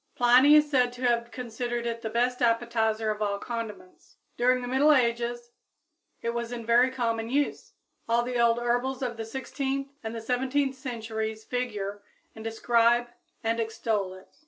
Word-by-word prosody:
Pliny 250 +5 +6
is 300 0 +6
said 255 -4 +2
to 245 +1 -9
have 235 -1 +1
considered 240 0 -4
it 230 -1 -3
the 220 - -3
best 245 +3 0
appetizer 225 -2 +1
of 210 0 -5
all 200 -1 0
condiments. 220 -4 -7 0.2
During 250 +1 +2
the - - -4
middle 270 +4 +4
ages 240 -2 +1 0.7
it 235 - 0
was 235 0 -3
in 235 -2 -5
very 240 +3 +5
common 230 -3 -2
use. 285 +3 -1 0.4
All 235 +1 +3
the 245 0 -2
old 235 0 +4
herbals 245 +3 -1
of 240 -2 -2
the 225 0 -5
sixteenth 270 +3 -3
and 225 0 -5
the - - -3
seventeenth 265 +3 0
centuries 220 -4 -4
figure 210 -5 -3 0.3
and 220 - -10
describe 235 +1 +2 0.3
and 225 +1 0
extol 220 -4 -1
it. 185 - -17
235 Hz, 165 wpm, -27 LUFS, 225-250 Hz, 0.7 s, Pliny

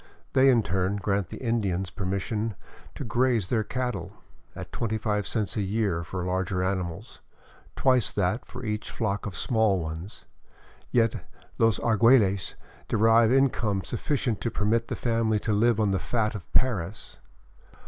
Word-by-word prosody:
They 135 0 +6
in 120 -4 +4
turn 95 +2 0
grant 100 -1 -1
the - - -8
Indians 100 -7 -1
permission 100 +3 -2 0.4
to - - -5
graze 120 -5 +1
their 110 -3 +1
cattle, 105 -7 -3 0.2
— - - -33
at - - -8
25 105 -2 -1
cents 105 -4 -2
a 105 - 0
year 100 -4 0
for 90 +2 -5
larger 90 0 -1
animals, 95 +2 -3 0.5
twice 130 -3 +3
that 105 +5 0
for 125 +1 -9
each 105 0 -3
flock 105 -3 -2
of 95 -5 -6
small 110 -3 +2
ones; 80 +5 -7 0.6
yet 115 -2 +1 0.2
" - - -29
los 115 -2 +4
Arguelles 110 -6 +3 0.3
derive 115 +1 +4
income 120 -7 +2
sufficient 120 - -2
to 115 - 0
permit 115 +2 0
the - - -3
family 115 -2 +1
to 105 +1 -1
live 110 +1 +3
on 105 -2 +2
the 95 - +1
fat 110 -3 -1
of 100 -5 -9
Paris. 105 -6 -1
105 Hz, 155 wpm, -27 LUFS, 95-115 Hz, 0.6 s, They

